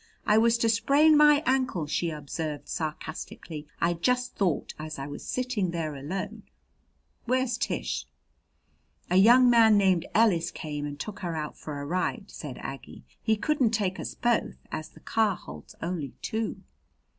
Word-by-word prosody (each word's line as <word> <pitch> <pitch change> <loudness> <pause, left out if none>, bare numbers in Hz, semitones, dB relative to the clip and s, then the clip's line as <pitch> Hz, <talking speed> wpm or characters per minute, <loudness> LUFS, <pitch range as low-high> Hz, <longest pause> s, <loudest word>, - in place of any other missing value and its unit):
"I 210 +1 +5
was 230 +1 +4
to 230 - +1
sprain 280 +8 +5
my 295 0 +6
ankle," 255 - +1
she 165 +3 -1
observed 150 0 -5
sarcastically. 155 -1 -5
"I 170 +1 +2
just 250 +8 0
thought 180 -7 -1
as 155 0 -6
I 135 - -4
was 145 - -7
sitting 250 -7 -1
there 165 -3 -3
alone 150 +8 -5 0.4
" - - -43
"Where's 255 0 +1
Tish?" 65 - -2 1.0
"A 180 - +4
young 240 +6 +7
man 225 -3 +6
named 190 -4 +3
Ellis 205 -7 +4
came 150 -2 -5
and 145 0 -7
took 210 +5 -6
her 175 -4 -3
out 150 -1 -4
for 150 -2 -7
a 140 - -5
ride," 185 +4 -2
said 140 -5 -7
Aggie. 135 - -8 0.2
"He 220 -1 +2
couldn't 245 -1 +1
take 190 -3 -1
us - - -5
both, 240 -2 +1 0.2
as 155 - -5
the 160 - -18
car 220 -4 +1
holds - - -11
only 165 -6 -3
two." 220 0 -3
185 Hz, 165 wpm, -28 LUFS, 155-230 Hz, 1.0 s, young